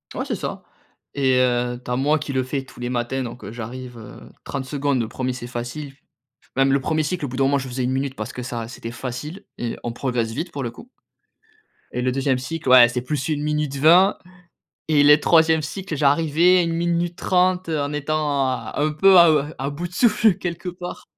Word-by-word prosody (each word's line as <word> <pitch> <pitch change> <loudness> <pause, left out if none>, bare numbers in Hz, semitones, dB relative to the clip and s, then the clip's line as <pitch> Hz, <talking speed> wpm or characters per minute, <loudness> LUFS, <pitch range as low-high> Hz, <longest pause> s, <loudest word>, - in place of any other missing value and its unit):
Ouais - - -3
c'est - - -2
ça - - -5 0.5
et 130 -2 +2
heu, 125 -1 0
tu - - -10
as 125 - 0
moi 145 +4 +2
qui 145 -1 -5
le 130 -1 +1
fais 135 +1 -3
tous 125 - -16
les 120 0 -3
matins, 125 +2 -2
donc 120 +1 -8
heu, - - -7
j'arrive, 120 +2 -8
heu, 110 -2 -11 0.2
30 135 -2 -5
secondes, 140 -1 -1
le 115 - -3
1er 130 +2 -3
c'est 125 -1 -7
facile. 120 +4 -6 0.6
Même 135 0 +3
le 140 - +3
1er 155 +3 0
cycle 155 +1 -2
au - - -3
bout 125 - -7
d'un 135 - +3
moment 140 +1 +2
je 135 -1 -5
faisais 125 0 -3
1 125 - 0
minute 135 0 -2
parce 110 +3 -5
que 125 - -6
ça 120 -2 -5
c'était 115 -1 -8
facile 130 +9 -6
et 120 -1 -3
on 120 - -3
progresse 120 -2 -2
vite 165 +9 -4
pour 140 - -5
le 120 - -2
coup 230 - -14 1.0
et 125 - -3
le 130 - +1
2e 135 0 0
cycle 140 +2 -4
ouais, 125 -2 +9
c'est 120 0 -3
plus 140 +2 -3
1 150 -2 -1
minute 150 -2 -1
20 175 +7 +5 0.7
et 145 -2 +5
les 145 +1 +7
3es 160 0 +4
cycle, 180 +3 -5
j'arrivais 160 +5 +3
1 165 -1 -1
minute 170 +1 -1
30, 185 -1 +1
heu, 155 -2 0
en 145 +1 -2
étant 150 -2 0
à 130 - -4
un 150 +1 +1
peu 190 +4 +6
à, 170 -1 +7
heu, 150 -3 +3 0.2
à 135 +1 -2
bout 160 +5 -5
de 175 - -18
souffle 220 +1 +4
quelque 175 -1 -5
part. 180 0 -7
140 Hz, 225 wpm, -22 LUFS, 125-160 Hz, 1.0 s, ouais